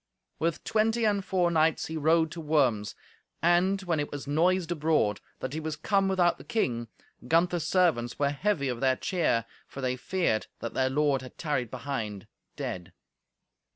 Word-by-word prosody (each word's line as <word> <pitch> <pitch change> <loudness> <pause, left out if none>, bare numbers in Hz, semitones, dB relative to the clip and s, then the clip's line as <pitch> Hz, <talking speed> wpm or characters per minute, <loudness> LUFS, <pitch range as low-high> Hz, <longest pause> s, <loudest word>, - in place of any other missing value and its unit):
With 165 0 -1
twenty 225 +1 +1
and 205 -2 +2
four 180 -2 +1
knights 160 -1 +2
he 160 - -5
rode 160 +1 +3
to 170 - -6
Worms. 130 -9 +1 0.4
And 175 +4 +3
when 170 -4 0
it 145 - -3
was 145 -1 -6
noised 170 +4 +1
abroad 150 -10 +1 0.2
that 130 +1 -4
he 155 - -2
was 155 -1 -3
come 195 +5 +1
without 180 -2 +2
the - - -10
king, 120 - -1 0.4
Gunther's 170 -1 +2
servants 165 -11 +2
were 140 -1 +1
heavy 145 -1 0
of 125 -2 -2
their 130 -1 +3
cheer, 150 -9 0 0.2
for - - -10
they 130 -1 0
feared 170 -5 -1
that 115 - -5
their 130 0 +1
lord 140 -1 +1
had 130 - -11
tarried 145 -7 -1
behind, 110 -9 -4 0.3
dead. 90 -2 -5
155 Hz, 170 wpm, -28 LUFS, 130-175 Hz, 0.4 s, rode